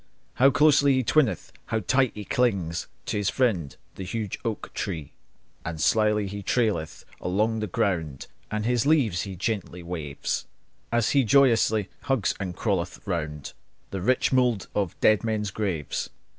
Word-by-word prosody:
How 135 - +8
closely 145 0 +5
he 130 - +1
twineth, 130 0 +1
how 110 -1 -1
tight 130 +6 +2
he 105 -1 -6
clings 95 -10 0 0.2
To - - -2
his 105 -1 +1
friend, 100 - 0 0.2
the 95 - -7
huge 105 +1 -4
oak 115 -3 -4
tree! 80 -8 -4 0.5
And 85 -1 -5
slyly 105 +3 +3
he 100 +1 -5
traileth 100 -7 -1
along 110 +5 0
the 105 - -2
ground, 85 - -1 0.2
And 110 0 -2
his 120 +2 +1
leaves 120 - +3
he 95 - -6
gently 90 -2 -3
waves, 80 -5 -4 0.4
And 120 0 +2
he 140 +3 +3
joyously 115 -3 +4 0.2
twines 135 -7 +1
and 95 -3 -4
hugs 95 -5 -1
around 75 -6 -3 0.4
The 95 - -3
rich 130 +6 +2
mould 125 -5 +2
of 100 -5 -2
dead 110 0 +4
men's 105 -3 -1
graves. 95 -8 -2
105 Hz, 155 wpm, -26 LUFS, 90-120 Hz, 0.5 s, How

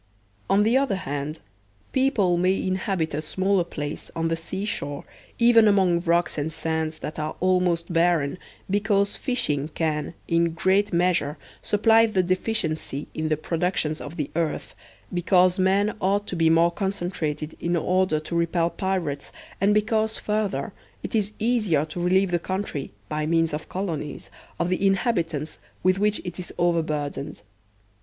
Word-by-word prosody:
On 200 +1 +4
the 225 +4 +3
other 270 -7 +1
hand, 145 -2 -4 0.5
people 245 -10 +2
may 185 +2 +2
inhabit 185 -4 -1
a 150 - -1
smaller 190 +4 +1
space 145 -1 -5
on 165 0 0
the 165 - +1
sea 190 +5 -5
shore, 145 -8 -4 0.3
even 235 -2 +6
among 190 -4 +4
rocks 170 -2 +1
and 150 +2 -2
sands 160 0 -2
that 155 - -5
are 155 +1 -3
almost 180 -2 +1
barren, 165 -2 +2 0.3
because 200 0 +1
fishing 150 - 0
can, 155 0 -2
in 170 0 +2
great 190 +4 +2
measure, 170 -4 +1 0.2
supply 225 +2 +4
the 190 -4 +1
deficiency 175 -6 -1
in 155 0 -2
the 155 - +1
pro 165 +2 -3
ductions 160 -3 0
of 150 +3 -7
the 150 -3 -3
earth, 165 -2 -2 0.4
because 180 +1 +3
men 195 +3 +2
ought 200 +2 +1
to 185 - -4
be 165 -1 +3
more 165 +1 +4
concentrated 175 -5 -3
in 175 +1 0
order 180 -1 +2
to 155 +2 -8
repel 170 0 +1
pirates, 175 -7 -2 0.3
and 200 +1 +4
because, 220 +1 +1
further, 210 -1 -2 0.3
it - - -5
is 210 -2 +1
easier 210 -10 +1
to 160 +3 -7
relieve 185 +1 +3
the 175 - +2
country, 185 -6 -4 0.2
by 150 +5 -2
means 165 -1 +2
of 150 - -5
colonies, 165 -6 -4 0.3
of 170 - 0
the 185 +1 0
inhabitants 175 - 0 0.2
with 185 +1 +3
which 210 0 +2
it 175 0 -5
is 180 - -6
over 170 -1 +3
burdened. 145 -7 -4
175 Hz, 160 wpm, -25 LUFS, 160-195 Hz, 0.5 s, even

